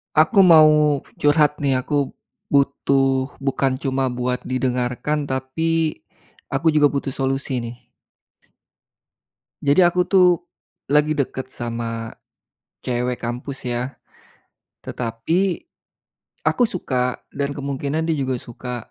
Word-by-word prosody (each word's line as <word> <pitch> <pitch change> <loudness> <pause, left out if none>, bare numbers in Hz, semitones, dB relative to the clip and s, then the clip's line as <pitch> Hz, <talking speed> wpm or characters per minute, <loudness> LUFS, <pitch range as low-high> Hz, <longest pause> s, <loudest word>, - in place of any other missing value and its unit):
Aku 155 +7 +4
mau 150 -3 +6 0.2
curhat 150 0 +3
nih 140 -3 +1
aku, 145 0 0 0.4
butuh 135 -1 +1
bukan 135 -1 0
cuma 135 0 -1
buat 125 0 -2
didengarkan 130 +3 -1
tapi, 155 +5 -1 0.5
aku 160 +4 +1
juga 150 -1 +5
butuh 140 -1 -3
solusi 135 -1 -1
nih. 120 0 -6 1.9
Jadi 140 +4 +3
aku 180 +1 +1
tuh, 185 -1 +5 0.6
lagi 150 +1 +3
deket 130 -2 -2
sama, 115 -2 -5 0.7
cewek 125 0 -2
kampus 125 +3 -5
ya, 120 +2 -2 0.9
tetapi, 165 - -1 0.8
aku - - +2
suka 125 -9 -2
dan 140 0 -2
kemungkinan 140 +2 -2
dia 165 -1 0
juga 130 -2 -1
suka, 125 +1 -7
135 Hz, 105 wpm, -21 LUFS, 125-150 Hz, 1.9 s, mau